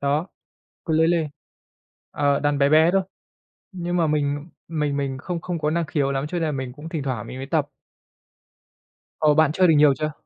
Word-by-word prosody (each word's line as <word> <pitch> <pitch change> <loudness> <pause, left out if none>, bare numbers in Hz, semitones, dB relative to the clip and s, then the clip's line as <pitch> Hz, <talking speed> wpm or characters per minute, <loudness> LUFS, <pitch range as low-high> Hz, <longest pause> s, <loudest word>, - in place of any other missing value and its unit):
đó, 145 +4 0 0.6
ukulele, 160 0 +2 0.8
ờ, 145 -1 +1
đàn 145 -1 +1
bé 140 0 +4
bé 160 +3 +5
thôi, 195 - +3 0.7
nhưng 175 -1 -3
mà 170 -2 +2
mình 145 +1 -1 0.2
mình 150 -3 -1
mình 135 -2 -2
không 170 +3 -4
không 175 -1 -4
có 150 -1 0
năng 170 0 0
khiếu 140 -2 0
lắm, 135 +1 -2
cho 165 - -8
nên 165 - -2
là - - -1
mình 130 -3 -4
cũng 150 +4 -9
thỉnh 160 -3 -3
thoảng 130 -5 -3
mình - - -8
mới 135 - -5
tập. 145 0 0 1.5
Ồ! 150 -1 +4
Bạn 155 -1 +4
chơi 185 +2 +3
được 160 - +5
nhiều 145 -1 +6
chưa? 155 0 -2
150 Hz, 200 wpm, -23 LUFS, 140-165 Hz, 1.5 s, nhiều